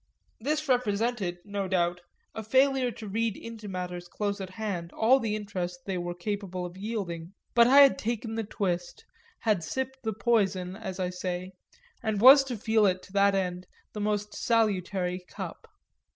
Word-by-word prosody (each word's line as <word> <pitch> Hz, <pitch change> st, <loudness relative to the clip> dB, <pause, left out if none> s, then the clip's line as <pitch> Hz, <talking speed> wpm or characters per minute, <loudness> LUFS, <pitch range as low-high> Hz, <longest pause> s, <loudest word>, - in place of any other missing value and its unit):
This 300 Hz, +6 st, -1 dB
represented, 225 Hz, -6 st, 0 dB
no 200 Hz, -1 st, -3 dB
doubt, 175 Hz, -1 st, 0 dB, 0.3 s
a 220 Hz, -, -5 dB
failure 260 Hz, +3 st, +3 dB
to 225 Hz, -2 st, -8 dB
read 225 Hz, +1 st, -1 dB
into 225 Hz, -2 st, -8 dB
matters 180 Hz, -2 st, -5 dB
close 200 Hz, +2 st, -3 dB
at 190 Hz, -, -5 dB
hand 185 Hz, -4 st, -4 dB
all 250 Hz, +5 st, +4 dB
the 220 Hz, -4 st, -1 dB
interest 180 Hz, -4 st, -4 dB
they 190 Hz, -2 st, -2 dB
were 175 Hz, 0 st, -4 dB
capable 185 Hz, -1 st, -4 dB
of 175 Hz, 0 st, -8 dB
yielding; 190 Hz, -5 st, -4 dB, 0.2 s
but 235 Hz, 0 st, +6 dB
I 275 Hz, +3 st, +8 dB
had 275 Hz, -1 st, +6 dB
taken 225 Hz, 0 st, -3 dB
the 225 Hz, 0 st, -2 dB
twist, 180 Hz, -, -3 dB, 0.4 s
had 210 Hz, -7 st, +1 dB
sipped 265 Hz, +10 st, -3 dB
the 220 Hz, -2 st, -2 dB
poison, 195 Hz, -5 st, +1 dB
as 190 Hz, -3 st, -6 dB
I 180 Hz, -1 st, -1 dB
say, 180 Hz, 0 st, -4 dB, 0.5 s
and 215 Hz, -2 st, -1 dB
was 270 Hz, +5 st, +9 dB
to 250 Hz, -3 st, -4 dB
feel 220 Hz, 0 st, +3 dB
it 185 Hz, -1 st, 0 dB
to 190 Hz, -, -15 dB
that 200 Hz, 0 st, +4 dB
end 180 Hz, -1 st, -2 dB, 0.3 s
the 210 Hz, -, -4 dB
most 210 Hz, 0 st, -1 dB
salutary 190 Hz, -5 st, 0 dB
cup. -, -, -7 dB
205 Hz, 170 wpm, -28 LUFS, 180-225 Hz, 0.5 s, was